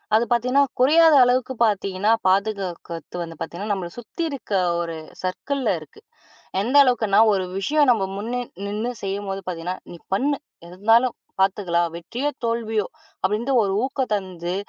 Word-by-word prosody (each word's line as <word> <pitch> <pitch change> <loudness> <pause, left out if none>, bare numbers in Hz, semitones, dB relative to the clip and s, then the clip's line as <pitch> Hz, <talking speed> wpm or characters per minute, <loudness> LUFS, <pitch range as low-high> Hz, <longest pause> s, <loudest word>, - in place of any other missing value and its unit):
அது 225 - +4
பாத்தீங்கன்னா 250 +4 +3 0.2
குறையாத 315 +4 +6
அளவுக்குப் 250 0 +1
பாத்தீங்கன்னா 200 0 0 0.2
பாதுகாக்கறது 185 -4 -1
வந்து 165 -1 -6
பாத்தீங்கன்னா 195 +6 -4
நம்மளச் 175 -3 -5
சுத்தி 240 +8 -8
இருக்க 275 -7 -8 0.3
ஒரு 165 -1 -4 0.3
சர்க்கிள்ல 265 +9 -2
இருக்கு. 445 - -15 0.6
எந்த 240 +7 -1
அளவுக்குனா, 225 -6 +3
ஒரு 190 -2 0
விஷயம் 290 +8 +2
நம்ம 220 -5 +3
முன்ன 240 +5 -3 0.2
நின்னு 210 +4 -2
செய்யும்போது, 195 0 -3
பாத்தீங்கன்னா, 180 +1 -3
"நீ 175 - -8 0.2
பண்ணு. 280 +7 +1 0.3
எது 170 +1 -11
இருந்தாலும் 230 +5 +4 0.3
பாத்துக்கலாம். 185 -3 +2
வெற்றியோ? 235 - -3 0.2
தோல்வியோ?" 225 -3 0 0.4
அப்படின்னு 215 +7 0
ஒரு 195 -2 0
ஊக்கம் 265 -2 -2
தந்து, 180 -3 -4
210 Hz, 140 wpm, -23 LUFS, 185-250 Hz, 0.6 s, குறையாத